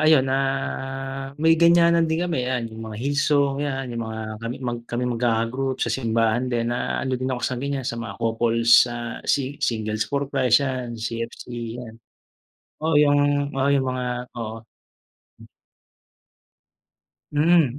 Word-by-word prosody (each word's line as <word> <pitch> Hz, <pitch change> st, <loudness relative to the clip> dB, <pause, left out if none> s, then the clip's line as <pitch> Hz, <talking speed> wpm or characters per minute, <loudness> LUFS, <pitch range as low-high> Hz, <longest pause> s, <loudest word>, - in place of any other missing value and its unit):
ayun, 155 Hz, -3 st, +5 dB
ah, 135 Hz, -, -3 dB
may 160 Hz, +2 st, +4 dB
ganyanan 170 Hz, -1 st, +5 dB
din 160 Hz, +2 st, 0 dB
kami. 170 Hz, -7 st, -1 dB
Yan, 120 Hz, -3 st, -2 dB
yung 110 Hz, 0 st, -7 dB
mga 110 Hz, -, -7 dB
hill 140 Hz, -, 0 dB
song, 140 Hz, -1 st, +2 dB
yan. 135 Hz, -3 st, -3 dB
Yung 115 Hz, -, -3 dB
mga 110 Hz, -1 st, -5 dB, 0.2 s
kami 115 Hz, +1 st, -4 dB
mag 120 Hz, -1 st, -2 dB
kaming 125 Hz, +1 st, -1 dB
magkaka-group 120 Hz, +3 st, 0 dB
sa -, -, -1 dB
simbahan 115 Hz, 0 st, +1 dB
din, 120 Hz, -1 st, 0 dB
na 120 Hz, -, -2 dB
ano 130 Hz, -, -2 dB
din 130 Hz, -, -1 dB
ako 125 Hz, -2 st, -3 dB
sa 125 Hz, -1 st, -2 dB
ganyan, 140 Hz, -1 st, -2 dB
sa 115 Hz, -1 st, -3 dB
mga 105 Hz, -4 st, -6 dB
couples, 115 Hz, +1 st, +4 dB
ah, 120 Hz, -1 st, -5 dB
si 140 Hz, 0 st, 0 dB
singles 110 Hz, -2 st, -1 dB
for 140 Hz, 0 st, 0 dB
Christ, 135 Hz, -1 st, +3 dB
yan. 125 Hz, -3 st, -3 dB
CFC, 115 Hz, +1 st, -5 dB, 0.4 s
yan. 115 Hz, 0 st, -12 dB, 0.8 s
Oo, 160 Hz, 0 st, 0 dB
yung 145 Hz, -1 st, +5 dB, 0.4 s
oo, 135 Hz, -, +2 dB
yung 140 Hz, -1 st, +3 dB
mga 125 Hz, 0 st, -3 dB, 0.3 s
oo. 110 Hz, 0 st, -5 dB, 2.7 s
Mm, 150 Hz, -3 st, +3 dB
130 Hz, 150 wpm, -23 LUFS, 115-140 Hz, 2.7 s, ayun